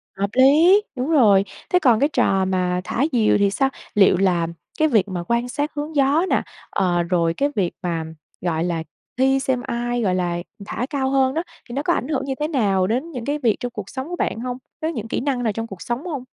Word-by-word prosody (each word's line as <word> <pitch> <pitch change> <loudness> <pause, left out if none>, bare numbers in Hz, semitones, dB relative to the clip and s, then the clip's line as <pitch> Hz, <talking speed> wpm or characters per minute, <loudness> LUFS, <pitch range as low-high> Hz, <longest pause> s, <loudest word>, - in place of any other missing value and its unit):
Hợp 200 +1 -1
lý, 315 +10 +6
đúng 260 +3 -2
rồi. 215 -11 +5 0.3
Thế 360 - +4
còn 245 -9 +4
cái 285 +3 +3
trò 195 -9 +2
mà 180 -1 0
thả 240 - -1
diều 230 -5 +3
thì 200 -1 +3
sao? 270 +7 +1 0.3
Liệu 195 -2 +5
là 175 -3 +2 0.3
cái 310 - +4
việc 220 -9 +2
mà 180 -3 -4
quan 235 +1 0
sát 290 +3 -2
hướng 300 +2 -4
gió 285 +5 +3
nè, - - +2 0.3
ờ, 175 -3 +1
rồi 170 -1 +1
cái 280 +10 0
việc 185 -4 +1
mà, 170 -2 -1 0.4
gọi 165 -2 -1
là, 170 -2 -2 0.3
thi 270 +1 +3
xem 265 -2 -1
ai, 240 0 -1
gọi 190 -4 +1
là, 175 -1 -1 0.3
thả 235 - -3
cao 270 -3 -1
hơn 265 -1 +2
đó, 330 - -1 0.3
thì - - -7
nó 275 - -1
có 345 - +2
ảnh 255 - -2
hưởng 275 -3 -1
như 270 - -2
thế 300 - 0
nào 200 - +1
đến 255 - -2
những 250 -6 -6
cái 290 +2 -1
việc 225 -3 +3
trong 245 - -4
cuộc 210 -4 -7
sống 265 +1 -5
của 355 - -3
bạn 225 - -2
hông? 250 +1 -4 0.2
Với 320 +1 -1
những 225 -5 -5
kỹ - - -2
năng 260 -2 -1
nào 220 -3 0
trong 225 +2 -4
cuộc 195 -5 -10
sống 240 - -3
hông? 295 -8 -4
240 Hz, 240 wpm, -22 LUFS, 195-275 Hz, 0.4 s, lý